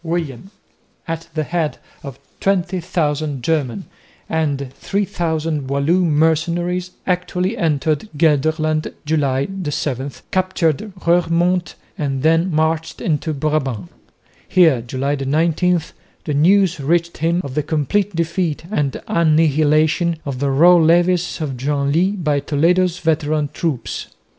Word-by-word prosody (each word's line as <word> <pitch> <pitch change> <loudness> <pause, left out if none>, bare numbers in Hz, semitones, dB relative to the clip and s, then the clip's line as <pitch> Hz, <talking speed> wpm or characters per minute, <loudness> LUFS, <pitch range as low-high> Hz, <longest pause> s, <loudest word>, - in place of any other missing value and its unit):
William 165 -2 -3 0.6
at 165 0 -4
the 155 - 0
head 160 -1 -2 0.2
of 135 -3 -8 0.2
20,000 165 -7 -1
German 155 +2 -1 0.4
and 140 -5 -2
3000 160 -5 -2
Walloon 160 +6 +2
mercenaries 170 +4 +1 0.2
actually 180 +2 -1
entered 155 - 0
Gelderland 155 0 +1
(July 140 -3 +1 0.2
7), 135 -1 -2 0.2
captured 185 0 0
Roeremonde 175 +1 +2 0.2
and 135 -3 -2
then 165 +3 +3
marched 160 0 -1
into 155 -1 -1
Brabant. 140 - -2 0.6
Here 160 -9 +4
(July 130 +4 -2
19) 165 +5 +2 0.4
the 150 - -3
news 175 +3 +3
reached 170 +4 0
him 165 +2 +1
of 140 - -6
the 150 - 0
complete 165 +7 -1
defeat 165 -1 -1
and 145 -9 -1
annihilation 155 +1 +2
of 135 -3 -4
the 140 0 0
raw 170 +6 +6
levies 175 +2 +2
of 140 -4 -3
Genlis 145 +8 +1
by 150 -6 0
Toledo's 170 +5 +1
veteran 155 -2 0
troops. 150 -9 -3
160 Hz, 115 wpm, -19 LUFS, 145-175 Hz, 0.6 s, raw